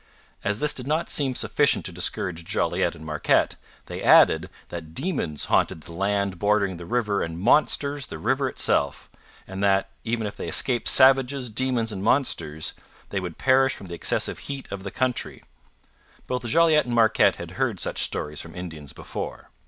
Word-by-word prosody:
As 100 +1 0
this 150 0 +1
did 130 0 -7
not 155 +3 -1
seem 135 -3 +1
sufficient - - +1
to - - -3
discourage 85 -2 -2
Jolliet - - 0
and 80 - -12
Marquette, 75 -1 +1 0.3
they - - -7
added 80 +4 +5 0.2
that 80 -2 -8
demons 130 - -1
haunted 80 - +1
the 85 - -13
land 100 +1 -1
bordering 100 -3 +1
the 85 0 -10
river 105 -2 0
and 80 0 -4
monsters 140 +5 +2
the - - -7
river 135 +1 0
itself, - - -1 0.3
and 95 +1 -6
that, 95 0 +2
even 115 -1 -2
if 105 - -5
they - - -6
escaped 125 -3 +1
savages, 130 -1 +4
demons, 120 -1 0
and 95 -2 -5
monsters, 85 - 0 0.4
they 100 - -2
would 90 -3 -6
perish 135 0 +3
from - - -9
the 90 - -7
excessive 85 - 0
heat 140 -1 -5
of 100 -1 -5
the 100 - -6
country 130 +3 -2 0.8
Both 125 -2 -3
Jolliet 160 +3 +4
and 120 - -2
Marquette 110 -1 +4
had - - -8
heard - - -2
such - - -2
stories 75 0 -1
from 85 - -11
Indians 80 -5 -8
before. - - -7
105 Hz, 175 wpm, -24 LUFS, 90-130 Hz, 0.8 s, added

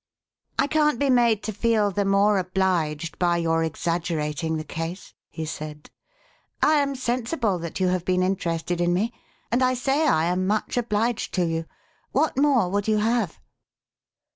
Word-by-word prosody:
"I 275 - +3
can't 300 -2 +2
be 275 +1 +2
made 235 -4 +3
to 215 - -3
feel 215 -1 +2
the 200 +1 0
more 200 +1 +3
obliged 175 -4 -1
by 175 -1 +2
your 165 -1 +1
exaggerating 160 -1 -2
the 155 - -4
case," 165 +4 -6 0.2
he 160 - -5
said. 150 -1 -7 0.4
" - - -34 0.3
I 305 0 +5
am 280 -1 0
sensible 240 - -1
that 170 +2 -5
you 185 -1 +2
have 180 -1 0
been 185 0 +1
interested 175 -2 -1
in 175 0 +2
me, 220 +6 0 0.4
and 240 +2 +2
I 255 0 +3
say 275 +5 +1
I 160 - +3
am 180 +2 0
much 210 +1 -1
obliged 230 -1 -1
to 180 -2 +2
you. 165 0 -2 0.5
What 300 +3 +2
more 270 -7 +3
would 205 +2 -1
you 215 -1 +3
have 220 -3 0
190 Hz, 170 wpm, -24 LUFS, 170-235 Hz, 0.5 s, I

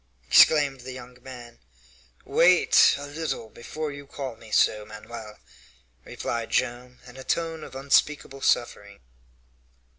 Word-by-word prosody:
exclaimed 145 -4 +5
the 130 +1 -8
young 125 0 -11
man. 120 -2 -12 0.7
"Wait 180 +1 +5
a 140 - -7
little 145 -6 -5
before 150 +6 -6
you 140 0 -10
call 135 -3 -6
me 115 0 -16
so, 105 0 +2
Manoel," 110 0 -10 0.7
replied 115 - -5
Joam, 125 +1 -2
in 125 0 -14
a 130 - -9
tone 165 0 -2
of - - -11
unspeakable 135 0 0
suffering. 100 -5 -1
130 Hz, 125 wpm, -25 LUFS, 115-145 Hz, 0.7 s, exclaimed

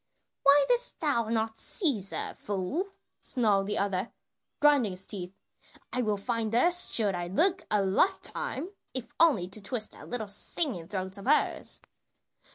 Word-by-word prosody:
"Why 280 +1 +6
didst - - +2
thou 275 -8 +1
not 225 -1 -1
seize 255 - 0
her, - - -4
fool?" 205 - -3 0.3
snarled 205 -6 +1
the 210 - -1
other, 200 +1 -1 0.5
grinding 285 -9 +4
his 185 +1 -2
teeth. 180 -3 -4 0.6
"I 250 - +1
will 210 -3 0
find 225 +1 -2
her 255 +10 +4
should 230 - +5
I 175 -1 -3
look 355 - +1
a 210 -2 +2
lifetime, 345 - 0 0.3
if 240 -2 -3
only 285 - +4
to 210 +3 -4
twist 215 +2 -4
that - - -12
little 235 -3 -2
singing 200 - -2
throat 190 0 -3
of 200 - -9
hers." 300 - +1
220 Hz, 155 wpm, -29 LUFS, 195-285 Hz, 0.6 s, Why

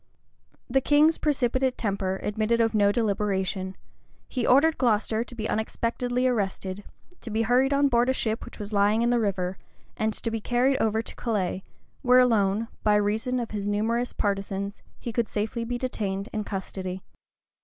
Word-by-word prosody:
The 270 +2 +2
king's 300 +4 +4
precipitate 260 -3 +1
temper 195 -3 -1
admitted 215 +2 0
of 225 -1 +2
no 205 -1 +4
deliberation: 195 -3 -1 0.5
he 250 -3 -2
ordered 305 +5 +4
Glocester 225 -2 +2
to 245 0 -11
be 220 -2 -3
unexpectedly 245 +3 -1
arrested; 200 -4 -1 0.4
to - - -8
be 220 +1 0
hurried 250 +4 +3
on 280 0 +4
board 240 -1 +2
a - - +3
ship 225 -3 -2
which - - -11
was 210 0 -7
lying 205 +3 +3
in 240 - +2
the 240 - +3
river; 190 -4 -1 0.4
and 220 0 0
to 230 +2 -4
be 225 -1 -3
carried 250 +4 +2
over 220 0 +1
to - - -9
Calais, 195 -5 -2 0.4
where 250 -1 +5
alone, 225 -3 +3
by 210 -1 +3
reason 220 +5 +1
of 235 - -4
his 205 -2 -3
numerous 225 +4 0
partisans, 200 0 -2 0.2
he 235 - -5
could 235 -1 0
safely 220 +3 -2
be 245 +1 -2
detained 205 -6 -3
in 215 -1 -2
custody. 190 -1 -5
220 Hz, 170 wpm, -26 LUFS, 205-245 Hz, 0.5 s, where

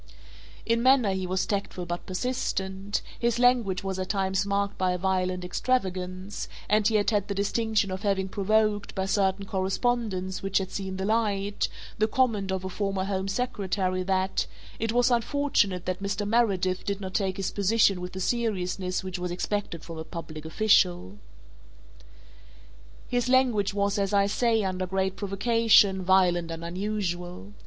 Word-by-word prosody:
In 230 0 +2
manner 255 -5 +4
he 190 -1 -2
was 185 +1 0
tactful 195 -3 -3
but 175 0 -5
persistent, 195 -2 -2 0.2
his 235 -1 +1
language 235 -7 +3
was 190 -1 -3
at 185 - -3
times 195 0 0
marked 200 0 0
by 185 -1 +1
a - - -1
violent 185 -1 -1
extravagance 185 -3 -2 0.2
and 210 0 +3
he 220 - +1
had 210 +1 +3
had 205 -2 +1
the 200 - -3
distinction 205 0 0
of 185 +1 -4
having 195 -2 0
provoked, 210 +1 +1
by 190 -1 -1
certain 195 0 +1
correspondence 190 -1 -1
which 195 0 0
had 190 -1 -1
seen 190 -1 -4
the 190 - -2
light, 205 -2 0 0.3
the 215 - +3
comment 215 -5 +1
of 190 0 -2
a - - -1
former 195 0 -2
Home 190 0 -2
Secretary 195 -4 -1
that 190 0 0 0.3
"it 225 0 0
was 245 +2 +3
unfortunate 235 - +1
that 185 +1 -3
Mr. 200 +1 -2
Meredith 195 -5 +1
did 200 -2 -2
not 190 -2 -6
take 190 -2 0
his 195 - -2
position 200 -2 +3
with 180 +1 -6
the 190 - -5
seriousness 190 -4 -1
which 185 -1 -5
was 180 0 -3
expected 180 -1 -3
from 165 -1 -8
a - - -4
public 155 -1 -8
official." 100 - +2 1.9
His 245 0 0
language 240 -6 +3
was, 200 0 +1
as 200 0 0
I 200 0 +4
say, 225 +1 +1
under 185 -1 -2
great 190 0 -1
provocation, 200 -1 +3
violent 180 -2 +3
and 165 0 -6
unusual. 175 - -4
195 Hz, 165 wpm, -27 LUFS, 185-215 Hz, 1.9 s, manner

